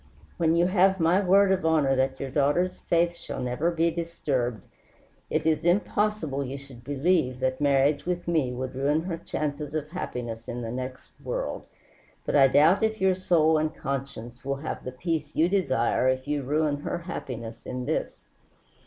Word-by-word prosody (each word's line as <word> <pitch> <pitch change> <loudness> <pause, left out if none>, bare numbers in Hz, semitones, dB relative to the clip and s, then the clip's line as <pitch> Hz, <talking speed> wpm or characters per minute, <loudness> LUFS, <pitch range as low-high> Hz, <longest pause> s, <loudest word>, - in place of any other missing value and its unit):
When 165 -1 +2
you 170 +1 +4
have 190 +1 +3
my 170 +4 +3
word 195 +1 +5
of 190 -1 +1
honor 155 -4 +3
that 130 0 0
your 135 -1 -4
daughter's 150 +6 +1
faith 170 0 +1
shall - - -7
never 125 +7 0
be 170 0 +1
disturbed, 140 - -2 0.7
it - - -1
is 160 0 +2
impossible 180 -5 +1
you 135 +1 -5
should 135 -3 -13
believe 140 -1 +1
that 130 +1 -1
marriage 140 +2 +2
with 175 -1 -2
me 155 -7 +1
would 130 +1 -4
ruin 145 +4 +1
her 170 -2 -4
chances 150 -2 -4
of 150 0 -3
happiness 120 -9 -5
in 120 0 -4
the 115 - -4
next 130 +1 -6
world. - - -4 0.6
But - - -1
I 135 -2 +7
doubt 150 +8 +5
if 220 0 0
your 190 0 +3
soul 160 -4 +3
and 155 0 -1
conscience 125 -3 -5
will 140 0 -1
have 145 +3 -5
the 130 - -5
peace 155 +2 -3
you 160 - +4
desire 130 -11 +1
if 130 +1 -1
you 145 -1 0
ruin 150 +2 0
her 145 - -3
happiness 120 -9 -7
in 125 0 -4
this. 155 - -3
150 Hz, 180 wpm, -26 LUFS, 130-170 Hz, 0.7 s, I